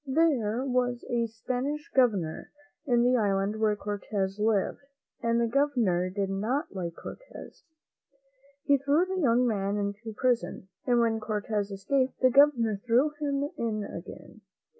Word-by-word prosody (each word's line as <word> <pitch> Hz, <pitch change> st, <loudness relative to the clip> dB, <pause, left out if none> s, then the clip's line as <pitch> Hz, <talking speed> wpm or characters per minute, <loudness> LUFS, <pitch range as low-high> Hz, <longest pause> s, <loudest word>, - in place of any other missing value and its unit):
There 265 Hz, -6 st, +1 dB
was 245 Hz, -2 st, 0 dB
a 235 Hz, -1 st, +1 dB
Spanish 255 Hz, +7 st, -4 dB
Governor 205 Hz, -12 st, +1 dB, 0.4 s
in 240 Hz, -2 st, +3 dB
the 250 Hz, +1 st, +4 dB
island 200 Hz, 0 st, 0 dB
where 215 Hz, -1 st, +2 dB
Cortez 205 Hz, -1 st, -3 dB
lived, 210 Hz, -2 st, +1 dB, 0.4 s
and 235 Hz, 0 st, +1 dB
the 235 Hz, -, +2 dB
Governor 230 Hz, -9 st, +1 dB
did 195 Hz, +1 st, -2 dB
not 220 Hz, +9 st, -2 dB
like 170 Hz, -3 st, -4 dB
Cortez. -, -, -11 dB, 1.0 s
He 280 Hz, -1 st, +3 dB
threw 285 Hz, +6 st, +2 dB
the 375 Hz, 0 st, -2 dB
young 250 Hz, -3 st, +3 dB
man 200 Hz, -3 st, 0 dB
into 205 Hz, +2 st, -4 dB
prison, 245 Hz, -6 st, -1 dB, 0.2 s
and 245 Hz, -1 st, +4 dB
when 225 Hz, -1 st, +1 dB
Cortez 210 Hz, -1 st, -2 dB
escaped, 255 Hz, +7 st, -1 dB
the 255 Hz, -1 st, +4 dB
Governor 240 Hz, -7 st, +4 dB
threw 250 Hz, +5 st, +3 dB
him 285 Hz, -1 st, -1 dB
in 220 Hz, -3 st, -1 dB
again. -, -, -10 dB
230 Hz, 140 wpm, -28 LUFS, 205-260 Hz, 1.0 s, the